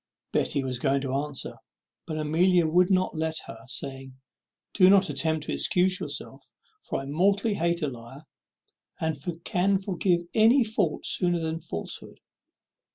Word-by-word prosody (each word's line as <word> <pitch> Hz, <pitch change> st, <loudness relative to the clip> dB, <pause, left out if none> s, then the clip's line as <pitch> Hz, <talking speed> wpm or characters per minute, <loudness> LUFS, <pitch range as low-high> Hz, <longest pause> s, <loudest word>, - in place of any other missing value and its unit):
Betty 140 Hz, -, 0 dB
was 130 Hz, -2 st, -3 dB
going 135 Hz, 0 st, +1 dB
to 135 Hz, -1 st, -3 dB
answer, 140 Hz, 0 st, -2 dB, 0.5 s
but 155 Hz, -, -4 dB
Amelia 170 Hz, +3 st, +3 dB
would 175 Hz, +3 st, +3 dB
not 185 Hz, -2 st, +1 dB
let 160 Hz, 0 st, -2 dB
her, -, -, -9 dB
saying, 135 Hz, 0 st, -3 dB, 0.6 s
"Don't 190 Hz, 0 st, +6 dB
attempt 160 Hz, -1 st, 0 dB
to -, -, -4 dB
excuse 185 Hz, +1 st, +2 dB
yourself; -, -, -5 dB, 0.3 s
for -, -, -4 dB
I -, -, -8 dB
mortally 195 Hz, +9 st, +1 dB
hate 170 Hz, -2 st, 0 dB
a -, -, +1 dB
liar, 130 Hz, +3 st, -10 dB, 0.7 s
and 160 Hz, -1 st, -1 dB, 0.3 s
can 195 Hz, +2 st, +1 dB
forgive 185 Hz, -2 st, 0 dB
any 230 Hz, +4 st, +5 dB
fault 210 Hz, -7 st, -1 dB
sooner 175 Hz, -1 st, +1 dB
than 160 Hz, 0 st, -3 dB
falsehood." 155 Hz, -, -6 dB
165 Hz, 145 wpm, -26 LUFS, 145-185 Hz, 0.7 s, Don't